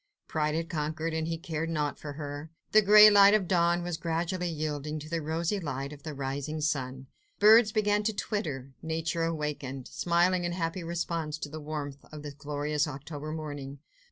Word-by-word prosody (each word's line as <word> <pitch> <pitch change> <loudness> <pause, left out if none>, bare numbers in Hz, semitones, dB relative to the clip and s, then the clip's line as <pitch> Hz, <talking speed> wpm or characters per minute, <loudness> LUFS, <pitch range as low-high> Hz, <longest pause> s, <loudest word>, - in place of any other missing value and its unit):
Pride 155 -1 0
had 165 +1 -1
conquered, 160 -1 -2
and 160 0 -1
he 165 0 -2
cared 165 -2 -3
naught 150 -3 -1
for 145 -1 -6
her. 145 +1 -6 0.2
The 215 - +7
grey 210 +1 +9
of 200 -1 +6
dawn 175 -1 +2
was 175 -2 -3
gradually 175 +2 -1
yielding 155 -1 -3
to 155 0 -8
the 165 +1 -2
rosy 165 +6 -1
light 140 -3 -4
of 145 - -12
the 155 -3 -6
rising 140 +3 -3
sun. 135 -3 -2 0.3
Birds 220 +1 +7
began 210 -1 +2
to 220 - +1
twitter; 145 - -3
Nature 165 +1 -1
awakened, 150 -5 -3
smiling 175 +1 +2
in 175 0 -1
happy 170 0 -2
response 165 -2 -2
to 145 - -6
the 155 +1 -7
warmth 145 -2 -5
of 150 -1 -8
this 145 -1 -6
glorious 145 +1 -1
October 150 +2 -6
morning. 145 -3 -6
155 Hz, 180 wpm, -29 LUFS, 145-170 Hz, 0.3 s, grey